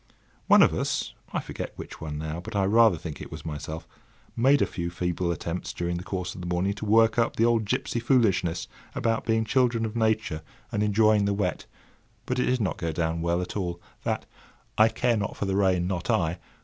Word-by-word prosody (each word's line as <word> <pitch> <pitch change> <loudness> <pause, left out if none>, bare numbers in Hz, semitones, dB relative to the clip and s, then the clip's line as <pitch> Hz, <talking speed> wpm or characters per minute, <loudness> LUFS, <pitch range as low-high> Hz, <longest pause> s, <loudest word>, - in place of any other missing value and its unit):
One - - +8
of - - +4
us—I - - -3
forget - - -6
which - - -9
one 75 -2 -4
now, 80 +2 -4
but 110 +5 -8
I 100 - +2
rather 110 -2 +5
think 80 -2 -7
it - - -8
was 80 -1 -8
myself—made 80 - -2
a - - +3
few 85 -2 -4
feeble 90 0 -1
attempts 85 +1 -4
during 85 0 -2
the 85 - -6
course 90 -2 -4
of 90 - -8
the 90 - -5
morning 90 +3 0
to 105 +1 -6
work 110 +2 +4
up 115 - +1
the 115 - +3
old 115 -2 +2
gipsy 110 +3 -1
foolishness 100 - +2 0.3
about 115 +3 0
being 110 0 +2
children 120 -1 +2
of 110 0 -5
Nature 110 -8 0 0.3
and 105 - -1
enjoying 105 0 +4
the 100 0 +1
wet; 95 -3 -2 0.6
but 125 0 -1
it - - +1
did 125 -1 +1
not 100 - -1
go 85 -1 -1
down 80 0 -1
well 85 +1 +1
at - - -7
all. 90 -4 -2 0.2
That— - - -1 0.5
"I 110 +1 +6
care 120 0 +1
not 100 -1 -3
for - - -2
the 95 -1 0
rain, 95 -3 +2
not 90 -2 -3
I!" 85 0 +1
95 Hz, 210 wpm, -27 LUFS, 85-110 Hz, 0.6 s, One